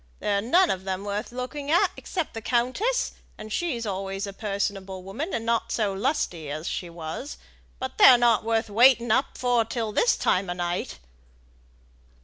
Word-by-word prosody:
They're 200 -1 0
none 345 - +4
of 190 0 -4
'em 190 +1 -2
worth 205 +2 -3
looking 255 +4 -5
at 335 +3 +4
except 350 -5 -4
the 225 - -6
countess, 255 - 0 0.3
and 215 0 -7
she's 265 -10 -2
always 195 0 -3
a 200 - -7
personable 195 -2 -3
woman, 235 - -5
and 225 -1 -3
not 230 0 0
so 210 -4 0
lusty 190 - -2
as 155 +4 -5
she 175 - -4
was. 170 - -6 0.4
But 260 0 -6
they're 250 - +9
not 240 -2 +3
worth 225 0 0
waiting 240 +1 +5
up 260 +5 +1
for 245 -2 +2
till 225 -1 -3
this 475 - +2
time 185 0 +1
o' - - -1
night." 175 0 -3
220 Hz, 170 wpm, -26 LUFS, 195-250 Hz, 0.4 s, they're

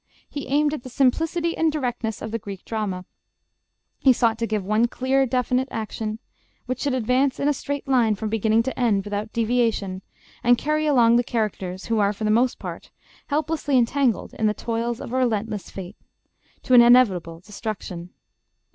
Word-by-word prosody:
He 285 - -6
aimed 295 +2 +2
at 305 - -4
the 255 - -9
simplicity 325 +7 +1
and 325 -1 +2
directness 245 -6 -3
of 220 - -5
the 230 - -2
Greek 195 -2 -9
drama. 200 -5 -3 0.9
He 270 - +5
sought 230 -2 +1
to 230 - -1
give 215 -3 -2
one 215 +4 +2
clear, 265 +2 +1
definite 250 +1 0
action, 220 0 -4 0.5
which 255 0 -3
should 280 -3 0
advance 255 +3 +1
in 280 - +1
a 295 - +3
straight 285 +1 -5
line 240 -5 +3
from 215 +2 -4
beginning 220 +1 +2
to 265 - -4
end, 215 -5 +2
without 205 +1 -4
deviation, 225 -5 0 0.4
and 245 +1 +5
carry 305 +2 0
along 240 -5 +5
the 240 - +2
characters 195 -6 -3
who 225 -1 0
are, 200 0 +2
for 210 - -7
the 215 - +2
most 240 +3 +2
part, - - -8 0.4
helplessly 300 -2 0
entangled 250 0 +1
in 220 - 0
the 210 - 0
toils 230 0 -2
of 235 - -7
a - - +1
relentless 220 -4 -1
fate 190 +1 -8 0.7
to 255 - 0
an 245 - +10
inevitable 200 -9 +4
destruction. 195 -3 -6
235 Hz, 180 wpm, -23 LUFS, 215-260 Hz, 0.9 s, an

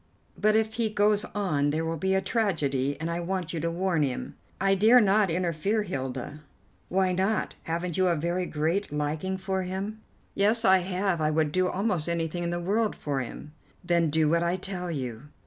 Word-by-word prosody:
But 215 0 +2
if 220 0 +1
he 225 -1 0
goes 210 0 +2
on 155 -8 +1
there 160 +2 -1
will 165 0 -1
be 190 +4 0
a 190 - +2
tragedy, 150 - 0
and 160 - -3
I 170 - -2
want 180 0 -3
you 165 - -2
to 170 - -1
warn 175 -1 0
him." 135 -4 -2 0.3
"I 195 0 +3
dare 220 +6 +6
not 205 -2 +3
interfere, 180 +5 0
Hilda." 135 -4 -5 0.5
"Why 190 0 +2
not? 190 +4 0
Haven't 170 +1 -2
you 185 -1 +3
a 175 - +3
very 175 +3 -1
great 160 +6 -1
liking 150 +6 -2
for 190 0 -2
him?" 195 +4 -4 0.3
"Yes, 215 +4 +2
I 190 0 +6
have. 185 -1 -1
I 155 - +2
would 155 -1 +1
do 185 +2 +2
almost 180 -4 -1
anything 170 +1 -2
in 170 - -1
the 175 0 -2
world 210 +5 0
for 140 -2 -2
him." 130 +4 -7 0.3
"Then 170 -2 +2
do 155 +1 +2
what 170 +2 +2
I 170 +1 +1
tell 185 -1 -5
you." 130 -4 -5
180 Hz, 200 wpm, -27 LUFS, 160-195 Hz, 0.5 s, dare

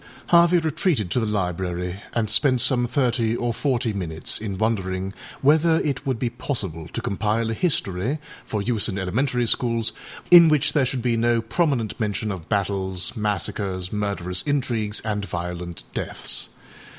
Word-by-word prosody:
â - - -20
Harvey 170 +1 +6
retreated 160 - 0
to - - +2
the 110 - -1
library 90 -2 -2
and 115 -2 +1
spent 130 +4 +3
some 120 0 +3
thirty 120 -4 +1
or 120 -1 -1
forty 125 -2 0
minutes 80 -5 -2
in 100 -3 -4
wondering 95 -3 -1 0.3
whether 160 +3 +4
it 140 -1 -2
would 130 -3 0
be 120 0 -1
possible 100 - -4
to - - -5
compile 110 +3 0
a - - 0
history, 115 - -1 0.3
for 105 -2 -3
use 115 -1 +2
in 100 - -3
elementary 120 +6 0
schools, 115 -1 +1 0.4
in 170 -2 +10
which 150 -3 +3
there 140 -4 +3
should 125 -1 -2
be 120 -2 +2
no 115 0 +2
prominent 120 - 0
mention 105 0 -1
of 90 -4 -7
battles, 95 -3 -1
massacres, 100 -2 -2
murderous 100 -3 -2
intrigues, 120 -7 -1
and 105 -2 -2
violent 90 -1 -5
deaths. - - -3
110 Hz, 160 wpm, -23 LUFS, 95-130 Hz, 0.4 s, in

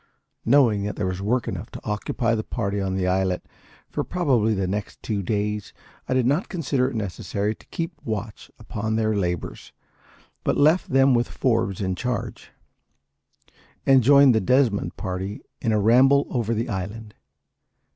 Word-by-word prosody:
Knowing 115 -5 +4
that 105 +1 -3
there 100 - -2
was 95 0 -3
work 120 +4 0
enough - - -5
to - - -9
occupy 105 +2 -1
the 110 -1 -1
party 100 -4 -2
on 95 -1 -2
the 95 -1 0
islet 95 0 0 0.4
for - - -3
probably 125 -12 +1
the 95 -1 -1
next 100 +3 -4
two 105 -3 -2
days, 105 +2 -2 0.4
I 130 - +1
did 130 -2 +2
not 145 +9 +1
consider 140 -8 0
it 135 - -8
necessary 100 0 -2
to - - -21
keep 165 +1 -4
a - - -10
watch 110 0 -5
upon 110 +1 -3
their 110 -1 +1
labours, 90 -4 -3 0.7
but - - +1
left 155 +5 +3
them 135 0 +4
with 120 0 +2
Forbes 110 -7 0
in 95 -1 -1
charge, 125 +6 -4 1.4
and 135 -1 +6
joined 140 +1 +6
the 110 - +2
Desmond 125 -1 +1
party 95 +2 -4 0.2
in 115 - 0
a 110 - +2
ramble 130 +7 +5
over 115 -3 0
the 115 +3 -1
island. 105 +2 -5
110 Hz, 165 wpm, -24 LUFS, 100-130 Hz, 1.4 s, and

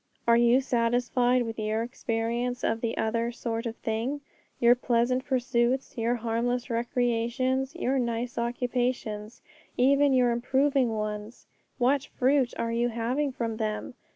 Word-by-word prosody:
Are 235 - +6
you 240 +2 +5
satisfied 245 0 +1
with 225 -1 -5
your 215 +1 -1
experience 235 0 -2
of 225 0 0
the 230 -1 -2
other 230 +1 0
'sort 230 -1 -3
of 225 - -5
thing'? 230 +7 -3 0.4
Your 240 0 +6
pleasant 245 +1 +1
pursuits, 255 -1 0
your 235 0 0
harmless 240 +2 -1
recreations, 245 +3 0
your 270 -5 0
nice 235 0 -2
occupations, 240 -2 -2 0.3
even 280 +2 +4
your 250 -2 +4
improving 265 +2 +2
ones, 210 +2 -5 0.3
what 270 +2 +2
fruit 260 -1 +3
are 230 - -1
you 235 +1 +1
having 245 +5 -1
from 230 -3 -3
them? 215 +1 -3
240 Hz, 135 wpm, -27 LUFS, 230-255 Hz, 0.4 s, Are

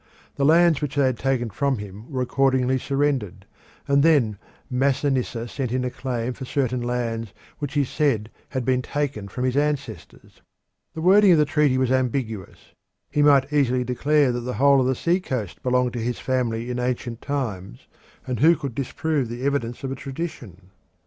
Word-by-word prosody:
The 140 - 0
lands 165 0 +5
which 145 -1 -3
they 140 -1 +3
had 130 -2 0
taken 130 -4 0
from 140 +5 0
him 105 +5 -9
were 130 -2 -1
accordingly 130 0 +2
surrendered, 135 -7 -1 0.4
and 140 0 +4
then 135 -10 +3 0.3
Masinissa 130 -2 0
sent 125 0 -4
in 125 0 0
a 125 - -2
claim 125 -2 -3
for 130 - -9
certain 130 -2 -1
lands 115 -2 -3 0.3
which 145 -1 -5
he 145 - +3
said 130 -6 0 0.2
had 130 -2 -3
been 130 0 +2
taken 140 -7 -3
from 125 +6 -5
his 130 0 0
ancestors. 145 -1 -3 0.5
The 160 - -4
wording 195 +1 +6
of - - +5
the 150 - +4
treaty 145 -2 +2
was 130 -1 +1
ambiguous. 125 -6 -2 0.4
He 150 - +1
might 145 -1 +4
easily 130 -3 +2
declare 140 +3 +2
that 120 - -2
the 125 +1 -4
whole 140 0 +5
of 125 - +1
the 130 - +1
sea 175 +8 +1
coast 125 - -4
had - - -33
belonged 125 -1 +1
to 120 - -3
his 120 +2 -2
family 120 -2 -1
in 125 - -3
ancient 125 -1 -3
times, 105 - -4 0.4
and 125 -3 -3
who 165 +5 +6
could 140 -5 -5
disprove 140 +1 -2
the 120 +2 -6
evidence 135 -4 -1
of 135 - -3
a - - -3
tradition? 130 - -7
130 Hz, 185 wpm, -23 LUFS, 120-140 Hz, 0.5 s, wording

